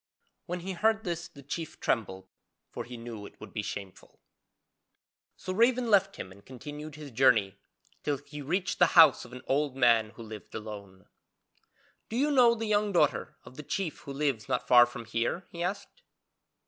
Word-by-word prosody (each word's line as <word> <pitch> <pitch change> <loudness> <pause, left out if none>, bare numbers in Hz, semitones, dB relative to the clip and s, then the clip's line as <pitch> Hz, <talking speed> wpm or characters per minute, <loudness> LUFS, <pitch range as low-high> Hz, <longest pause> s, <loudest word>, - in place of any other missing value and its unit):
When 180 0 -3
he 190 +2 -4
heard 220 +4 +1
this 170 -1 -3
the 145 -5 -15
chief 155 +3 -6
trembled, 95 -5 -1 0.4
for - - -6
he 125 0 -8
knew 115 -3 -8
it - - -19
would - - -11
be 110 - -2
shameful. 100 -2 -8 1.2
So 185 - -5
Raven 235 +3 +3
left 195 -1 +4
him 95 - -7
and 100 +1 -16
continued 150 +4 -9
his 150 -2 -9
journey 110 -5 +3 0.4
till 145 -1 -1
he 145 +2 -10
reached 180 +7 -1
the - - +7
house 155 -7 +8
of 120 - -14
an 125 +1 -9
old 140 0 0
man 115 -4 +4
who 115 - -9
lived 110 -2 -10
alone. 100 -4 -8 1.0
'Do 225 - -5
you 290 +3 +2
know 245 -4 +6
the 225 0 -3
young 210 -1 +1
daughter 150 -6 +1
of 130 - -14
the - - -5
chief 155 +3 -3
who 145 - -9
lives 135 -4 -1
not 125 -1 -1
far 120 -1 +8
from 120 -1 -8
here?' 115 +11 -2
he 170 - -7
asked. 190 +3 -4
145 Hz, 185 wpm, -29 LUFS, 115-180 Hz, 1.2 s, house